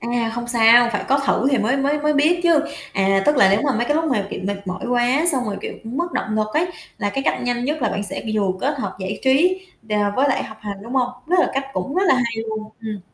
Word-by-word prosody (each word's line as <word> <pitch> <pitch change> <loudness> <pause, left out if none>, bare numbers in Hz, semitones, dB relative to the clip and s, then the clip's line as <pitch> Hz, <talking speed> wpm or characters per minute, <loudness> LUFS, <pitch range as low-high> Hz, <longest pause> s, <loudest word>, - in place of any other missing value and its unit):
À, 235 0 -1
không 240 0 -5
sao, 235 0 +6
phải 205 - -2
có 275 +2 +3
thử 270 - +2
thì 270 - +2
mới 220 +5 +1
mới 280 +2 +1
mới 300 +1 +2
biết 310 +4 +3
chứ. 335 -3 +4 0.3
À, 195 0 +2
tức 295 - +4
là 195 - +6
nếu 200 - +3
mà 280 - +2
mấy 235 - 0
cái 295 - 0
lúc 320 +1 +1
mà, 240 -10 0
kiểu, - - -5
mệt 200 0 -4
mỏi 185 0 -5
quá, 245 +5 +2
xong 255 -3 0
rồi, 205 -3 -3
kiểu, - - -5
mất 320 +10 -3
động 215 - -2
lực 215 0 +1
ấy, 320 +3 +2 0.3
là 205 -2 -1
cái 270 - -2
cách - - 0
nhanh 245 0 -1
nhất 300 +1 -2
là - - +2
bạn 200 - -3
sẽ 205 - -4
vừa 200 -3 +1
kết 285 +1 -1
hợp - - -4
giải 190 +2 -4
trí, 350 +8 +3 0.3
ờ, 210 - +1 0.2
với 275 +2 +3
lại - - +1
học 220 - -10
hành, 205 -1 -5
đúng 235 +4 -7
hông? 255 -2 +2 0.2
Đó 355 +3 +2
là - - +1
cách 270 0 -1
cũng 275 +1 -3
rất 375 - +2
là - - +6
hay 235 -3 -1
luôn. 215 0 -5
Ừm. 215 -3 -5
245 Hz, 280 wpm, -21 LUFS, 215-285 Hz, 0.3 s, sao